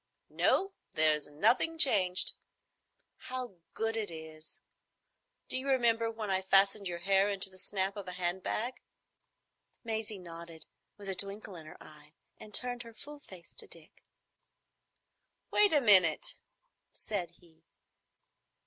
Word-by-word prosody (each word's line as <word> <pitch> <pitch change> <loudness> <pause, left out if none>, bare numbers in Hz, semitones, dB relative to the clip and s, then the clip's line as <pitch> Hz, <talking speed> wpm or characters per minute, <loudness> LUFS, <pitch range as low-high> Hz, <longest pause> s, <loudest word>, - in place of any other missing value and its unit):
"No, 390 +1 +1 0.2
there's 155 -1 +3
nothing 245 - +2
changed. 190 - +4 0.8
How 250 -6 -7 0.2
good 225 0 -2
it 220 -3 -3
is! 160 -1 -12 0.9
D'you 260 +2 -1
remember 235 -4 +2
when 220 -3 -4
I 190 0 +1
fastened 195 +1 +3
your 175 -1 -4
hair 195 +3 +2
into 195 -1 -1
the 185 - -13
snap 195 +1 -2
of 200 -2 -8
a 180 - -6
hand 180 +1 -2
bag?" 240 +7 -2 1.0
Maisie 220 -2 -3
nodded, 170 -2 -10 0.3
with 200 -1 -11
a 195 - -2
twinkle 200 +1 0
in 160 -2 -11
her - - -12
eyes, 150 0 -16 0.3
and 215 - -12
turned 245 +2 0
her 230 -2 -12
full 295 +4 -10
face 185 -10 -13
to - - -7
Dick. - - -15 1.5
"Wait 415 -1 +4
a 300 - +4
minute," 235 - +6 0.5
said 190 -5 -4
he. 165 -2 -24
195 Hz, 135 wpm, -31 LUFS, 175-230 Hz, 1.5 s, minute